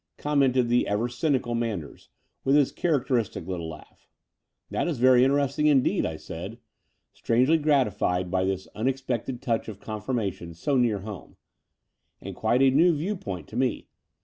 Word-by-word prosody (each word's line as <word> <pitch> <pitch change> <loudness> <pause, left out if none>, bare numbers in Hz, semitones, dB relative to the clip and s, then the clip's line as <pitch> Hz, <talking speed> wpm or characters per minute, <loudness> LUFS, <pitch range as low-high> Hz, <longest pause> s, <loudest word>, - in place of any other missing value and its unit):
commented 135 -4 +2
the 120 +1 +2
ever 105 +4 0
cynical 125 -1 -1
Manders, 110 -10 -4 0.3
with 135 +1 +3
his 145 -3 +4
characteristic 125 - -1
little 85 -3 -4
laugh. 75 -1 -13 0.6
"That - - -1
is 155 -8 -2
veiy 125 0 +6
interesting 140 +2 +2
indeed," 140 -4 +3
I 80 - -5
said, 85 +7 -8 0.6
strangely 130 +8 +2
gratified 105 - +1
by 95 0 +1
this 95 0 -2
unexpected 130 +1 -2
touch 115 -2 -1
of 105 -3 -8
confirmation 105 -6 -4
so 140 - -1
near 115 -6 +2
home, 100 -7 -9 0.4
" - - -52
and - - -8
quite 125 +3 +2
a 135 - +5
new 165 +5 +4
view 180 +8 -2
point 90 - -6
to - - -10
me. 125 -2 -1
120 Hz, 155 wpm, -26 LUFS, 100-135 Hz, 0.6 s, veiy